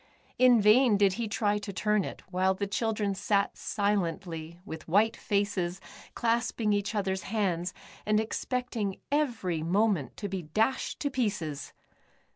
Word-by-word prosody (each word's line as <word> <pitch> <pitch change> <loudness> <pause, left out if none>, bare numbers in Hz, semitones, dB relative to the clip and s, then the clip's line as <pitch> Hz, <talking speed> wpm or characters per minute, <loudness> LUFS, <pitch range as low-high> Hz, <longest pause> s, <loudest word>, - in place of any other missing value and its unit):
In 250 -2 +7
vain 215 +2 +5
did 200 -2 +4
he 225 - -1
try 210 -1 0
to 205 -1 -6
turn 210 +1 +1
it, - - -7
while 190 +1 +2
the 200 - -2
children 210 0 -1
sat 200 +1 0
silently 175 -5 -2
with 160 -5 -8
white 210 +6 +3
faces, 200 -3 -1 0.4
clasping 230 -2 +1
each 205 +1 -1
others 190 -2 -1
hands, 185 -5 0 0.3
and 215 0 +2
expecting 225 -2 -2
every 230 - 0
moment 185 -2 +1
to 205 - -3
be 190 -1 -3
dashed 215 +11 0
to 285 - -1
pieces. 175 - -2
205 Hz, 140 wpm, -29 LUFS, 185-220 Hz, 0.4 s, In